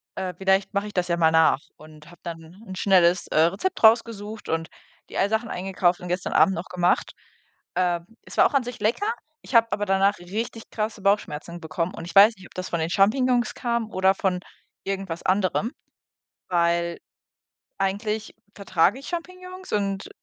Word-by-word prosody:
äh, 185 -1 -3
vielleicht 190 +1 +1
mache 200 +1 -1
ich 210 - -9
das 180 -2 -1
ja 170 - +1
mal 160 -1 +4
nach“ 160 -4 +4 0.2
und 155 0 -15
habe 175 - -17
dann 165 0 -8
'n 190 -3 -8
schnelles, 180 -2 +3
äh, - - -2
Rezept 195 - +1
rausgesucht 220 -1 +3
und 165 +1 -1 0.4
die - - -7
ei 195 - +3
Sachen 220 +2 -1
eingekauft 180 -1 0
und 180 - -8
gestern 180 +1 -2
Abend 190 - +4
noch 170 - -5
gemacht. 180 -1 +1 0.6
Äh, 175 -1 +1 0.2
es - - -12
war - - +7
auch - - -12
an 270 - +3
sich 245 0 -7
lecker, 410 - +1 0.3
ich - - -7
habe 230 0 +6
aber 205 0 -1
danach 195 +1 +2
richtig 220 +5 -5
krasse 215 -1 -3
Bauchschmerzen 175 -4 -1
bekommen 165 +3 -3
und 165 - -7
ich 170 - -9
weiß 210 +3 +8
nicht, 190 - -13
ob - - -22
das 185 0 -5
von 170 - -1
den 160 +1 -1
Champignons 245 +5 +2
kam 235 -2 -2
oder 190 +1 +3
von 185 -2 0 0.5
irgendwas 195 -4 -4
anderem, 195 +4 +1 0.8
weil 170 -1 +1 0.8
eigentlich 210 +3 -2 0.2
vertrage 195 +2 +1
ich 275 - -10
Champignons. 365 +2 -7
Und 195 -1 -1
195 Hz, 180 wpm, -24 LUFS, 175-220 Hz, 0.8 s, weiß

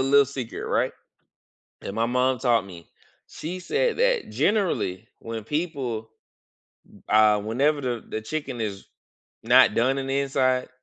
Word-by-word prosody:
little 140 +1 +5
secret, 130 -4 -6
right, - - +1 0.9
that - - -6
my 115 +2 +1
mom 125 +2 +1
taught 120 -4 +2
me. 85 -4 -12 0.4
She 175 +4 -6
said 460 - 0
that - - +1
generally 165 - 0
when 115 -1 -6
people 135 -8 -3 1.0
uh, 105 -1 +5
whenever 135 +8 +1
the 125 -4 -3
the 110 - -4
chicken 125 +1 -5
is 100 -3 -4 0.6
not 120 -1 +6
done 130 +4 +2
in 135 - -3
the 135 +1 0
inside 130 -2 +1
130 Hz, 140 wpm, -25 LUFS, 110-140 Hz, 1.0 s, not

